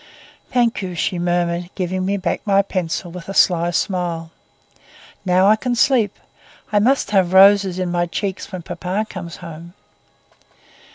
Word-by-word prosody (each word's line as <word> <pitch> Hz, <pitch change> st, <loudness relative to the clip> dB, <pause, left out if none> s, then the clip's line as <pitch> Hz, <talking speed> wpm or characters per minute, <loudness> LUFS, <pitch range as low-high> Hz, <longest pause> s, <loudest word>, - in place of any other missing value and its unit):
"Thank 240 Hz, -3 st, +1 dB
you," 180 Hz, -2 st, -5 dB
she 175 Hz, +1 st, -1 dB
murmured, 175 Hz, 0 st, -1 dB
giving 185 Hz, 0 st, -2 dB
me 200 Hz, +1 st, 0 dB
back 190 Hz, -, -2 dB
my 200 Hz, -1 st, +3 dB
pencil 180 Hz, -2 st, -3 dB
with 180 Hz, +1 st, -9 dB
a 195 Hz, -, -5 dB
sly 175 Hz, -1 st, +3 dB
smile. 175 Hz, -2 st, -2 dB, 0.9 s
"Now 185 Hz, +1 st, +3 dB
I 210 Hz, +2 st, +6 dB
can 245 Hz, +2 st, -2 dB
sleep. 235 Hz, -4 st, +2 dB, 0.5 s
I 210 Hz, -, +3 dB
must 250 Hz, 0 st, +1 dB
have 190 Hz, -3 st, +2 dB
roses 195 Hz, -1 st, +6 dB
in 180 Hz, -1 st, -2 dB
my 175 Hz, 0 st, 0 dB
cheeks 190 Hz, +2 st, -4 dB
when 185 Hz, -3 st, -6 dB
papa 185 Hz, +5 st, -3 dB
comes 170 Hz, -5 st, -8 dB
home." 170 Hz, +2 st, -10 dB
185 Hz, 155 wpm, -20 LUFS, 175-200 Hz, 0.9 s, I